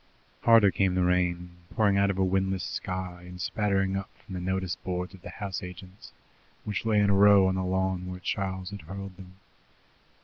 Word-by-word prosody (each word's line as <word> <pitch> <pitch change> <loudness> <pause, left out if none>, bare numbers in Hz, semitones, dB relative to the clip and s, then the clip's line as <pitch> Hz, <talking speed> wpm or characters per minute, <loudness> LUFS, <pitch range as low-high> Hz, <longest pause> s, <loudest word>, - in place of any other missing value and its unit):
Harder 115 -4 +6
came 95 -1 +1
the 90 - +2
rain, 90 -1 0 0.2
pouring 105 -3 +3
out 100 0 +3
of 95 - -1
a 95 - +2
windless 95 0 0
sky, 90 -1 -4
and 90 0 -11
spattering 95 +1 0
up 95 0 -4
from 95 - -12
the 90 - -3
notice 95 0 -1
boards 90 0 -4
of 95 - -13
the - - -9
house 100 -3 -5
agents, 90 +2 -10 0.5
which 105 +2 -3
lay 105 -2 +3
in 100 -1 +4
a - - +4
row 100 -1 +7
on 95 - +1
the 95 0 -1
lawn 95 0 -1
where 90 0 -6
Charles 95 0 -3
had 100 - -7
hurled 95 +4 -8
them. 95 -1 -13
95 Hz, 200 wpm, -28 LUFS, 90-100 Hz, 0.5 s, row